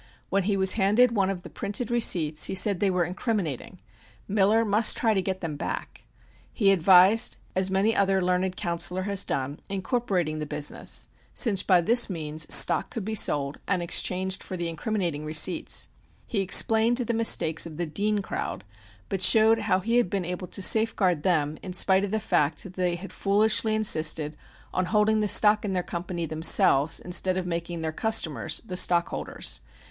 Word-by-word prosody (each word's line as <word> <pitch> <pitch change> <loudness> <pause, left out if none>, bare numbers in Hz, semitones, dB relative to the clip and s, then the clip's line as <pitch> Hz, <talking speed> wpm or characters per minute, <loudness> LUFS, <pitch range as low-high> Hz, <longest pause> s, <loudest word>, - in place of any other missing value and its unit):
When 195 -1 -1
he 200 - -1
was 190 -1 +4
handed 220 +4 +2
one 200 -4 -1
of 185 -2 -6
the - - -11
printed 210 +4 -4
receipts 160 -10 +1
he - - -5
said 195 0 +2
they 200 - 0
were 180 -1 -1
"incriminating." 185 - -5 0.5
Miller 210 +3 +1
must 215 +2 0
try 225 -2 0
to 195 - -1
get 190 0 -5
them 160 -4 -6
back. - - -8 0.5
He 200 -4 +1
advised 190 +4 +3 0.2
(as 190 0 -1
many 195 +3 0
another 195 -2 0
learned 180 0 -2
counsellor 175 0 -1
has 200 -1 -1
done) 140 +2 -5
incorporating 190 - -3
the 150 - -6
business, 145 0 -1 0.3
since 200 -6 +3
by 185 -3 +2
this 235 +6 +4
means 155 -3 -4
stock - - +8
could 225 -6 -7
be 220 - -5
sold 145 -8 +1
and 185 -3 -2
exchanged 185 +2 -1
for 185 - -8
the 170 -1 -4
incriminating 170 -4 -4
receipts. 155 +4 0 0.4
He 220 - -4
explained 225 +4 +4
the 240 -2 -2
mistakes 170 -8 +3
of 155 -2 -12
the 175 - -3
"Dean 205 +5 -2
crowd," 100 - -6 0.4
but 195 - -5
showed 220 +3 +5
how 195 -4 -1
he 230 +5 -1
had 240 -7 0
been 195 -2 -4
able 180 +1 -7
to 195 - -3
safeguard 195 -7 +2
them 155 -3 -2
in 185 - -9
spite 190 +1 +3
of 200 - -3
the 220 +2 -2
fact 150 -6 -2
that 190 - -12
they 180 -2 -2
had 185 +3 -11
foolishly 215 +2 0
insisted 155 -7 +1 0.4
on 185 - -2
holding 215 +2 0
the 210 - -1
stock 210 +1 +4
in 200 -2 -4
their 180 -1 -2
company 175 0 -6
themselves 155 -1 +3
instead 185 +1 -1
of 185 - -4
making 170 -1 -6
their 160 -1 -4
customers 160 -5 -1
the 185 - -7
stockholders. 175 -1 0
190 Hz, 180 wpm, -24 LUFS, 170-210 Hz, 0.5 s, stock